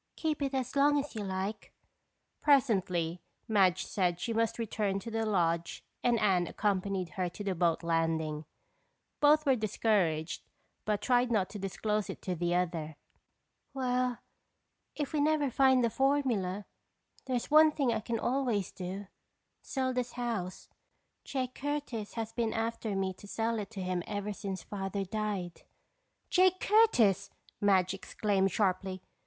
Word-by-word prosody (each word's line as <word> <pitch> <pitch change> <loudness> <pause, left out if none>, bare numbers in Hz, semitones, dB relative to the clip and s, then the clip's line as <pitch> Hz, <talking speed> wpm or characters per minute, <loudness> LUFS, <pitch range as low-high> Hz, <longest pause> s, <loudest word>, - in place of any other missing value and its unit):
"Keep 310 -2 -1
it 275 -1 -1
as 260 0 -2
long 290 +1 +4
as 285 +1 -2
you 215 -3 -4
like." 190 +2 -4 0.7
Presently, 190 - +2 0.3
Madge 190 -4 +3
said 180 -3 0
that - - -23
she 230 +6 -2
must 225 0 +1
return 210 -3 -1
to 230 +4 -6
the 225 0 -1
lodge 170 -4 0 0.2
and 240 -1 +3
Anne 185 -5 +3
accompanied 195 -3 -1
her 180 +3 -2
to 205 - -8
the 195 -2 0
boat 170 -1 +1
landing. 160 -2 0 0.7
Both 300 +1 +5
were 270 -2 +4
discouraged 195 -7 0 0.4
but 210 -1 0
tried 245 0 +3
not 200 -5 +1
to 210 - -6
disclose 210 +2 -1
it - - -5
to 185 - -1
the 175 0 0
other. 165 -3 -1 0.8
"Well, 250 -2 0 0.8
if 295 -1 -3
we 300 - +2
never 295 -2 +2
find 260 0 +4
the 230 - +2
formula, 240 -9 +1 0.6
there's 255 +1 -2
one 310 +1 +8
thing 275 -6 +1
I 220 - 0
can 230 +2 -2
always 240 -7 0
do—sell 200 +7 -6
this 245 -1 -2
house. 225 -7 -3 0.6
Jake 255 -2 -3
Curtis 285 -8 -4
has 225 -1 -4
been 230 -2 0
after 225 -2 -2
me 190 -1 0
to 205 - -14
sell 225 +2 -1
it 205 - -5
to 200 -4 -6
him 180 -1 -1
ever 205 0 -3
since 195 -2 -5
Father 195 0 -3
died." 200 -3 -3 0.7
"Jake 370 0 +4
Curtis!" 235 - +4 0.3
Madge 190 -2 +3
exclaimed 195 0 0
sharply. 185 -1 0
210 Hz, 150 wpm, -31 LUFS, 185-250 Hz, 0.8 s, one